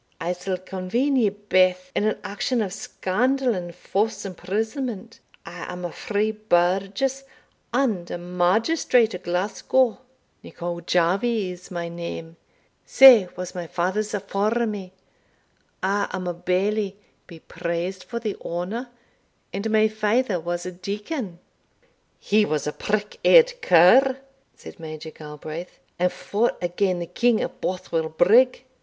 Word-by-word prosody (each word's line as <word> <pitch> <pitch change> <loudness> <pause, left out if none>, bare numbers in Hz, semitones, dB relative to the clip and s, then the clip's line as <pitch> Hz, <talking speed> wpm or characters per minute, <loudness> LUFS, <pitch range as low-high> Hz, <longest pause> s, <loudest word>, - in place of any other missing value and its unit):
I'se 180 +2 -2
convene 195 +10 -1
ye 220 -4 +4
baith 185 -2 +1
in 205 - +1
an 215 - +1
action 235 +5 -1
of 195 -2 -5
scandal 250 +7 0
and 175 -3 -5
false 205 +3 -1
imprisonment 220 - -4 0.3
I 180 0 -7
am 180 0 -6
a 175 - -4
free 215 +4 -1
burgess 210 +6 0 0.5
and 230 -9 0
a - - -3
magistrate 215 - +2
o' 180 - -5
Glasgow; 205 +8 0 0.4
Nicol 170 0 -6
Jarvie 185 +5 +1
is 180 0 -11
my 170 -2 -4
name, 170 -1 -7 0.5
sae 250 -8 +8
was 180 0 -6
my 175 -2 -5
father's 190 +6 -1
afore 205 +4 0
me 200 -4 -5 0.9
I 200 +2 +1
am 185 -1 -3
a 175 - -1
bailie, 195 +4 0 0.3
be 165 -2 -12
praised 170 +3 -4
for 235 - -6
the 220 -3 -3
honour, 195 +9 -4 0.6
and 200 +3 -2
my 220 0 +4
father 215 -1 0
was 175 +1 -4
a 180 - -4
deacon." 200 - -5 0.8
"He 215 +1 +2
was 155 -7 -1
a 150 - -2
prick 210 0 -2
eared - - +6
cur," 250 +11 +6 0.4
said - - -12
Major 160 0 -7
Galbraith, 155 +3 -8 0.2
"and 180 0 +2
fought 220 +4 -1
agane 180 +1 0
the 175 - -3
King 235 +5 +2
at - - -5
Bothwell 170 -3 -2
Brigg." 230 +11 +4
195 Hz, 135 wpm, -24 LUFS, 175-220 Hz, 0.9 s, sae